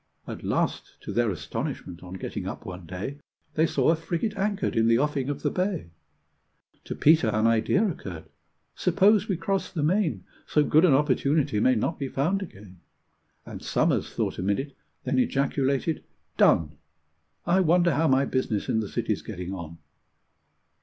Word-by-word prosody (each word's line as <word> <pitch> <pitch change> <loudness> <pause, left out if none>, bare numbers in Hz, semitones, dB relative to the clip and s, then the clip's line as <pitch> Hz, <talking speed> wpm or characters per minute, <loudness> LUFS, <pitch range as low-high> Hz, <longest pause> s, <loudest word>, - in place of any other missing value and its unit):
At - - -7
last, - - -2
to - - -6
their 120 -1 +2
astonishment, 85 0 -5
on 90 0 -9
getting 95 - -5
up - - -6
one 90 -2 -8
day, 100 - -5 0.3
They 160 +1 +3
saw - - +1
a - - +3
frigate 170 +6 -3
anchored 200 0 -1
in 115 0 +3
the 115 0 +5
offing 140 -1 0
of 145 - -4
the - - +1
bay. 180 - -2 0.9
To - - -5
Peter 155 -4 +4
an 110 0 +1
idea 115 - +3
occurred. 95 - -6 0.5
"Suppose 200 +3 +3
we 190 - -1
cross 195 +3 -2
the 155 -5 -2
main? 160 - +1 0.2
So 150 - +3
good 155 +4 +4
an 150 -7 +5
opportunity 145 -4 +1
may 130 +4 +4
not 160 +9 -1
be 140 - -2
found 165 +10 0
again." 100 - -11 0.7
And - - -8
Somers - - 0
thought - - -2
a - - -1
minute, 120 +9 -1 0.3
then 130 0 0
ejaculated, 140 +3 0 0.3
"Done! 75 -2 +3 0.7
I 175 +2 +3
wonder 175 -1 +3
how 160 +3 +2
my 135 0 +3
business 125 -7 -1
in 110 - +2
the 105 -3 -3
City's - - -2
getting 90 +1 -6
on?" 85 -3 -7
140 Hz, 165 wpm, -26 LUFS, 105-170 Hz, 0.9 s, the